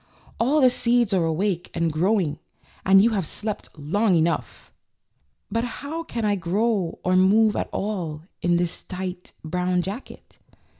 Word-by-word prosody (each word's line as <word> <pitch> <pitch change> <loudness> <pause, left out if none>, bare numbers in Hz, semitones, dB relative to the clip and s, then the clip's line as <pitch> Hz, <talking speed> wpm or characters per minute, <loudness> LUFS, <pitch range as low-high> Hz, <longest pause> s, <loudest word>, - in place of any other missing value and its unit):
All 280 +6 +3
the 255 -1 +6
seeds 235 -3 +2
are 180 -3 +2
awake 175 +2 -1
and 165 -2 0
grow 190 +8 +2
ing, 150 -4 -2 0.4
and 195 +1 +6
you 230 - +4
have 195 -7 -1
slept 210 +4 -5
long 185 +7 +1
enough." 165 +1 -1 0.8
"But 230 0 0
how 285 +6 -5
can 230 -8 -4
I 205 - +2
grow 195 0 0
or 185 0 +2
move 210 +4 +4
at - - -2
all 175 -7 -3 0.2
in 175 -1 +2
this 175 -1 -1
tight, 185 -1 -6
brown 180 +2 0
jacket?" 205 +8 -8
190 Hz, 155 wpm, -24 LUFS, 175-220 Hz, 0.8 s, the